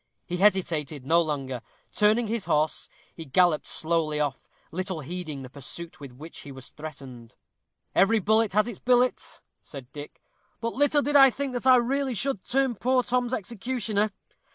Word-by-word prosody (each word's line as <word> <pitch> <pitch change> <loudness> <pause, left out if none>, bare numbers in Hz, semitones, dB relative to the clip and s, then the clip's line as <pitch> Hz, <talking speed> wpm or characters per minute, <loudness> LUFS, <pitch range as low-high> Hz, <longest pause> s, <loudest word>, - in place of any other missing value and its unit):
He 180 - -3
hesitated 165 -8 +1
no 165 +4 +4
longer. 135 -6 -3 0.3
Turning 215 +3 +3
his 225 -1 -3
horse, 150 +1 0 0.3
he 165 - -7
galloped 160 +2 +2
slowly 160 -2 0
off, 145 -3 -3 0.2
little 185 -1 -3
heeding 155 -2 -5
the - - -8
pursuit 155 +5 -6
with 140 -3 -9
which 155 +6 -11
he 145 - -10
was 130 -1 -9
threatened. 135 -6 -10 0.6
"Every 195 +4 +4
bullet 220 +1 +2
has 215 +2 +3
its 235 -6 -6
billet," 250 0 +1 0.2
said 135 -3 -11
Dick; 145 0 -10 0.4
"but 230 0 -3
little 290 +1 +3
did 290 +1 -1
I 270 -1 +9
think 270 +1 -3
that 245 +1 -2
I 255 - +8
really 260 +1 +1
should 215 -3 -1
turn 265 0 +1
poor 255 +3 +1
Tom's 245 0 0
executioner. 220 -1 -1
190 Hz, 165 wpm, -26 LUFS, 150-240 Hz, 0.6 s, I